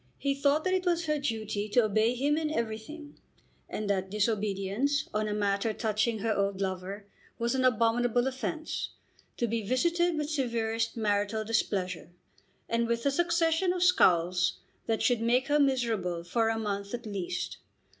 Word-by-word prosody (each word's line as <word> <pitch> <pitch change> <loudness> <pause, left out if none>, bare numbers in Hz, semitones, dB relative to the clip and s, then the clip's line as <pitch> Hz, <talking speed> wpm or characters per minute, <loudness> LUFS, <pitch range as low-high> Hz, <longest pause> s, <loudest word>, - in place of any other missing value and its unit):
He 280 -1 0
thought 280 +2 +2
that 370 - +1
it 370 -1 0
was 340 -1 +1
her 305 -1 0
duty 215 -6 -2
to 245 +3 +4
obey 215 +3 +2
him 285 +4 +1
in 310 -1 -1
everything, 290 +4 -5 0.5
and 215 - -3
that 190 -1 0
disobedience 210 +5 0
on 215 0 0
a 210 - -1
matter 205 +1 0
touching 220 +1 0
her 220 +1 0
old 200 -1 0
lover 190 +1 -4 0.3
was 235 +1 0
an 260 -1 +1
abominable 245 0 +2
offence, 265 +4 -3 0.4
to 240 - +1
be 230 +1 -1
visited 335 - +1
with 300 -1 -1
severest 230 -4 -1
marital 210 0 0
displeasure, 190 -6 -1 0.6
and 230 0 0
with 235 +1 -1
a 280 - +4
succession 340 +2 +2
of 360 -1 0
scowls 180 - +3 0.3
that 225 -1 0
should 245 -3 +2
make 250 +4 +2
her 295 +1 +4
miserable 225 -11 +1
for 225 +6 +1
a 225 - 0
month 200 0 -3
at 240 0 -9
least. 200 -4 -4
230 Hz, 165 wpm, -29 LUFS, 205-280 Hz, 0.6 s, to